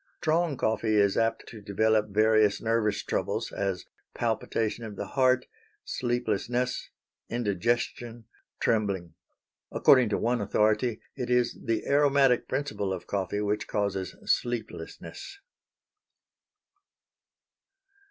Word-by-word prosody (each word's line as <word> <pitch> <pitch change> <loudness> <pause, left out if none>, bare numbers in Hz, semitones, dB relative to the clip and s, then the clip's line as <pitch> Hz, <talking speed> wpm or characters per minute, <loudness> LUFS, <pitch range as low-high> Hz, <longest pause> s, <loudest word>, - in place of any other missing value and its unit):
Strong 160 -2 +1
coffee 110 -1 +1
is 100 -2 +3
apt 115 0 0
to 110 -3 -10
develop 105 +1 +1
various 110 0 +3
nervous 110 -2 0
troubles, - - -2
as 95 -2 -2 0.3
palpitation 115 +1 -1
of 110 -2 -7
the 100 - -5
heart, 130 -1 +3 0.4
sleeplessness, 120 +1 -1 0.4
indigestion, 120 +1 -1 0.3
trembling. 100 -7 0 0.6
According 130 -5 +5
to 105 - 0
one 120 0 0
authority, 110 +3 +1
it 125 -3 -4
is 125 -1 +2
the 115 -1 -1
aromatic 140 -3 +3
principle 105 -9 -2
of 90 -2 -4
coffee 100 +1 -2
which 105 0 -1
causes 100 -3 -2
sleeplessness. 385 - -3
110 Hz, 105 wpm, -28 LUFS, 105-125 Hz, 0.6 s, According